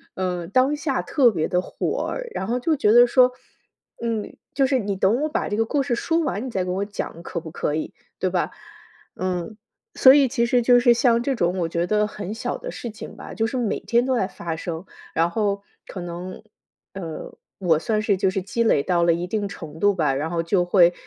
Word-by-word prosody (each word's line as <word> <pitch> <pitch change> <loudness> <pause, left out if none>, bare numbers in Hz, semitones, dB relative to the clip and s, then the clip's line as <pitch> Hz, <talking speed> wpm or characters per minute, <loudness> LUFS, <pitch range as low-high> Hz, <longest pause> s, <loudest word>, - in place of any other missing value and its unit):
嗯， 180 -2 -3
当 260 +6 +3
下 290 -3 -1
特 265 -6 +4
别 160 -5 -1
地 180 0 +1
火 - - -3
儿， - - -4
然 190 - -3
后 245 +3 0
就 315 +5 +1
觉 210 -7 +3
得 240 +1 +8
说：” 250 0 +5 0.7
嗯， 225 -3 -3 0.2
就 275 - +3
是 265 -2 +2
你 200 -2 -2
等 205 +8 +2
我 310 - 0
把 - - -1
这 205 - -1
个 225 - +3
故 280 +4 0
事 240 - 0
说 330 +7 0
完， 265 -7 -2
你 - - -4
再 185 -3 -1
给 180 - -2
我 195 +2 -1
讲 185 -4 -6
可 170 - -4
不 160 - -9
可 150 - -2
以， 155 - -4 0.3
对 - - +1
吧？ - - -1 0.7
“嗯， 185 +3 -3 0.4
所 260 0 +8
以 280 -2 +5
其 235 -2 0
实 245 0 +2
就 245 +1 +5
是 240 -1 +5
像 235 -1 +3
这 275 - 0
种 180 -2 0
我 165 - -1
觉 170 +1 -1
得 210 +1 +2
很 205 -1 -6
小 225 - -3
的 - - -7
事 235 - -6
情 215 - -10
吧， - - -9
就 225 0 0
是 260 - -5
每 235 -4 -1
天 235 +1 +1
都 260 - +1
在 190 -5 +1
发 170 -4 -5
生， 170 +1 -5 0.3
然 165 +1 +2
后， 200 0 -1 0.2
可 185 - -7
能， 175 +3 -7 0.5
呃， 170 -5 -7 0.2
我 165 -4 +3
算 215 +4 0
是 205 -3 +1
就 190 0 +2
是 190 0 -2
积 230 +5 -3
累 145 -10 +3
到 175 -2 +1
了 170 -1 +4
一 170 +1 -2
定 205 0 -1
程 160 -4 -9
度 205 -1 +3
吧， 150 -6 +1
然 150 +4 -2
后 165 -1 -1
就 175 +1 +1
会， 175 -1 +5
205 Hz, 250 characters per minute, -23 LUFS, 175-240 Hz, 0.7 s, 得